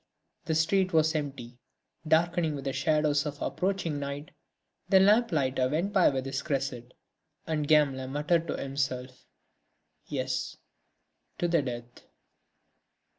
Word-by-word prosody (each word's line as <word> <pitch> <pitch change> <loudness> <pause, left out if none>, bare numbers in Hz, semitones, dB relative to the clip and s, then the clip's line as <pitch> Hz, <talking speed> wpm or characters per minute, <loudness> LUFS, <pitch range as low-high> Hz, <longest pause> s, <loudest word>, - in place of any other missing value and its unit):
The 160 - 0
street 185 +3 +2
was 160 0 +3
empty, 135 -5 -5 0.5
darkening 160 0 +2
with 140 -1 -7
the 135 - -1
shadows 150 +1 +1
of 145 0 -6
approaching 180 -6 -1
night; 140 +1 -5 0.6
the 190 - +6
lamplighter 165 - +3
went 170 +8 -1
by 190 -3 +5
with 130 -1 -2
his 135 0 -3
cresset, 130 -4 -3 0.5
and 155 -2 -1
Gamelin 140 -4 +3
muttered 160 +4 +1
to - - -2
himself: 135 -2 -4 0.8
"Yes, 130 -2 -3 0.8
to 175 - 0
the 170 -2 +2
death!" 120 -2 -7
145 Hz, 125 wpm, -29 LUFS, 135-165 Hz, 0.8 s, the